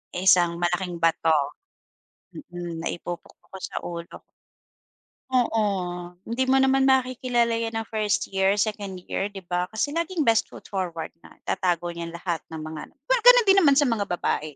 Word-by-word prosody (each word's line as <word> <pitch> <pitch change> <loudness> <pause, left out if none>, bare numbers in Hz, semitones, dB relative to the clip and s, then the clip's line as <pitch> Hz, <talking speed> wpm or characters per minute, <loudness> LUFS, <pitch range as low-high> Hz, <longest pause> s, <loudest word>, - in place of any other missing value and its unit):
Isang 175 -2 +4
malaking 175 +1 -1
bato, 165 -1 +3 1.0
mm, 175 - -7
na - - 0
ipupukpok 175 0 -8
ko 190 - -7
sa - - -6
ulo. 170 -1 -7 1.1
Oo, 245 -4 +2 0.6
hindi 260 +3 -1
mo 265 - +4
naman 265 0 +4
makikilala 255 -2 +2
'yan 225 0 -3
ng 225 - -1
1st 210 -3 0
year, 195 +1 +2
2nd 205 -2 -2 0.2
year, 195 - 0
'di 195 -2 -10
ba? 180 +1 -1
Kasi 220 +8 -2
laging 335 0 -1
best 225 -3 +3
foot - - -13
forward 175 -4 -3
nga, - - -17
itatago 175 -2 -1
niya 170 0 -6
lahat 170 -1 -2
ng 160 -1 -7
mga 155 -1 -6 0.3
well, - - +4
ganun - - +9
din 390 0 +7
naman 285 -6 +5
sa 290 - +5
mga 225 -6 0
babae, 155 -4 -2
195 Hz, 165 wpm, -25 LUFS, 175-255 Hz, 1.1 s, ganun